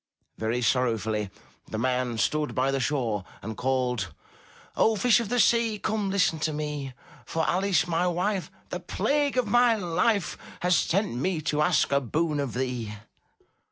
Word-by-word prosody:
Very 115 +3 -1
sorrowfully, 110 -4 +1 0.4
the 110 - -5
man 125 0 0
stood 150 +8 0
by 130 +1 +2
the 135 - 0
shore 120 -6 -1 0.2
and 110 +2 -5
called: 125 -7 -1 0.6
"O 220 - +3
Fish 235 +3 +4
of 230 -4 -3
the 245 - +1
Sea, 230 -2 +3
come, 210 -1 -1
listen 185 -5 +2
to 155 0 0
me, 150 -3 -4 0.3
For 160 -1 -2
Alice, 190 +1 +2
my 175 +1 +1
wife, 185 +2 -1 0.2
the - - -3
plague 285 -2 0
of 250 - +3
my 240 +2 +4
life. 190 0 0 0.2
Has 180 0 +3
sent 195 - +1
me 160 +8 -1
to 150 -1 0
ask 150 - +2
a 140 0 +3
boon 150 +4 -1
of 135 -5 -3
thee." 125 -4 -3
150 Hz, 160 wpm, -27 LUFS, 125-200 Hz, 0.6 s, Fish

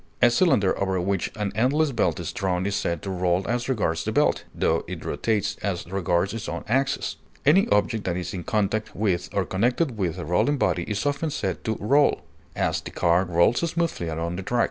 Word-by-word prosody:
A 120 - +5
cylinder 120 - +3
over 95 -1 +1
which 95 0 -1
an 105 -2 -2
endless 140 +8 +2
belt 90 - 0
is - - -4
drawn 95 -2 -1
is 100 - -1
said 85 -5 -2
to 95 - -3
roll 90 0 0
as 120 +2 -1
regards 95 -10 0
the - - -2
belt, - - +2
tho - - 0
it - - -7
rotates 110 -3 -1
as 95 -4 -2
regards 95 0 0
its 115 0 -5
own - - -4
axis. 135 +4 0 0.3
Any 165 +8 +5
object 105 +1 +1
that 90 -1 -1
is 90 - -4
in 90 - -4
contact 110 -2 -1
with 95 -4 0
or 100 -2 0
connected 120 - 0
with 90 -4 -1
a - - -5
rolling 90 - +2
body 90 -8 +1
is 105 +4 -2
often 145 +2 0
said 150 - -3
to 110 -1 -1
roll; 140 +8 +3 0.3
as, - - 0
the - - -8
car 85 +2 +2
rolls 85 +6 +3
smoothly 170 - -1
along 85 +2 -3
the - - -3
track. 120 +6 -1
100 Hz, 210 wpm, -25 LUFS, 90-120 Hz, 0.3 s, A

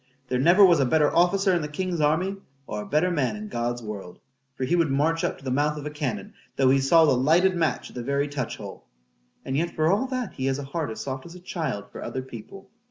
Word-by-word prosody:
—There 125 - 0
never 175 +8 +7
was 175 -4 +5
a 135 - +3
better 150 +3 +2
officer 190 +3 +3
in 175 - +1
the 150 - -3
king's 175 +2 -3
army,—or 150 - -2
a - - -8
better 160 +5 +2
man 130 -9 0
in 105 0 -7
God's 120 +1 -2
world; 100 -5 -7 0.4
for 130 - -4
he 150 +7 +1
would 165 -3 +2
march 155 +5 +1
up - - -1
to - - -18
the 130 - -3
mouth 150 +3 +1
of 150 - -7
a 150 - -4
cannon, 130 -10 -4 0.2
though 130 -1 +4
he 135 - +4
saw 160 +5 +5
the 150 - +4
lighted 170 +9 +3
match 160 -7 -1
at - - -18
the 125 - -4
very 140 +3 0
touch 140 -5 -4
hole,—and 60 - -10
yet, 170 +4 -1
for 155 +1 +2
all 210 +7 +1
that, 255 -4 -3
he 130 - -3
has 135 0 0
a 145 - -5
heart 145 +2 -3
as 110 - -6
soft 130 +2 -5
as 170 - -12
a - - -10
child 155 - -4
for - - -9
other 130 - -4
people. 130 - -11
145 Hz, 250 wpm, -25 LUFS, 130-170 Hz, 0.4 s, never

